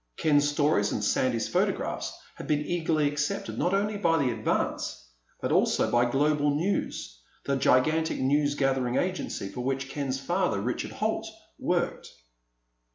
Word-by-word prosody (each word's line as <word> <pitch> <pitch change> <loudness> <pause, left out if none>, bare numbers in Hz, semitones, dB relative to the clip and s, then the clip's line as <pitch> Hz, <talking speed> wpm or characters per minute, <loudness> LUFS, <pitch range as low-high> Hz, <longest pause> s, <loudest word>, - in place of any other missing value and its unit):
Ken's 145 -1 +3
stories 145 -8 +2
and 105 - -2
Sandy's 115 +1 +1
photographs - - -1 0.2
had - - -9
been 150 0 +1
eagerly 160 -3 +1
accepted 150 +7 -2
not 175 - +1
only 205 +1 0
by 165 -5 +2
the 135 -5 +1
Advance, - - -2 0.3
but - - -2
also - - +2
by 120 0 +3
Global 145 +2 +2
News, 160 - -2 0.3
the 140 - +1
gigantic 155 +5 +2
news 145 +2 +2
gathering 130 -3 +1
agency 180 - -2
for 125 - -6
which 135 +1 -2
Ken's 135 -2 -2
father, 140 - 0
Richard 120 +5 -2
Holt, - - -1 0.3
worked. - - -1
145 Hz, 145 wpm, -28 LUFS, 130-160 Hz, 0.3 s, Ken's